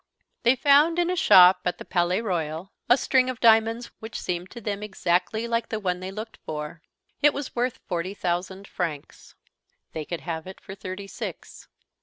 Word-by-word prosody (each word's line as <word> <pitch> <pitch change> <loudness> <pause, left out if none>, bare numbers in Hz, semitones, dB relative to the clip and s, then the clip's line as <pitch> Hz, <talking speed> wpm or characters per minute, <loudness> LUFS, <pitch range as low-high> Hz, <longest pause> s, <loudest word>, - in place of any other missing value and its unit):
They 240 +2 +4
found, 290 +5 +4
in 350 0 +2
a - - 0
shop 180 - +7
at 180 - -1
the - - -9
Palais 180 +2 +1
Royal, 170 -3 -3 0.2
a 245 - +7
string 255 -1 +2
of 255 - -5
diamonds 225 +1 +3
which 220 0 -7
seemed 180 0 -4
to 240 - -9
them 205 -2 -4
exactly 210 +2 -1
like 230 0 -1
the 220 - -2
one 180 -3 -1
they 185 +1 -6
looked 215 +3 -7
for. 150 +1 -6 0.4
It 295 0 +5
was 285 -2 -5
worth 245 0 -1
forty 185 +2 -3
thousand 185 +2 -3
francs. 150 -4 -6 0.6
They 155 -1 -5
could 170 +1 -5
have 165 -1 -5
it 190 - -10
for 190 - -10
thirty 195 0 -7
six. 195 - -8
195 Hz, 185 wpm, -25 LUFS, 180-235 Hz, 0.6 s, shop